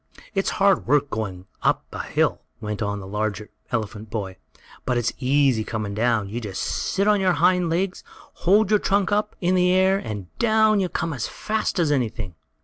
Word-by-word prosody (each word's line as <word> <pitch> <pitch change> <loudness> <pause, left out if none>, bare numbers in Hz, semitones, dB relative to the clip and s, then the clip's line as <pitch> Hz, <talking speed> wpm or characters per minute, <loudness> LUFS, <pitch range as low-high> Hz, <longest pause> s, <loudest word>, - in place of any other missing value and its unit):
"It's 195 -1 0
hard 195 -7 +3
work 145 +1 +2
going 95 -4 -4 0.2
up - - +1
hill," - - 0 0.2
went 105 -1 -4
on 100 -1 -1
the 95 - -8
larger 105 +1 -3 0.2
elephant 110 -2 -3
boy, 100 -4 -4 0.5
"but 125 -1 0
it's 120 0 0
easy 135 -3 +3
coming 105 -2 -4
down. 110 -1 +1
You 115 +5 -5
just 100 -4 -4
sit 200 +1 -1
on 210 -1 +4
your 185 -1 +3
hind 180 0 +3
legs, 180 +3 -1 0.4
hold 200 +3 +4
your 210 - +5
trunk 195 -1 +1
up 210 +1 0
in 180 +1 +2
the 180 -1 +3
air 190 +1 +4
and 105 - -7
down 220 -2 +4
you 185 -2 0
come 165 -1 -2
as 125 -4 -3
fast 215 -1 -2
as 165 -4 +2
anything!" 115 -8 -1
140 Hz, 185 wpm, -23 LUFS, -, 0.5 s, your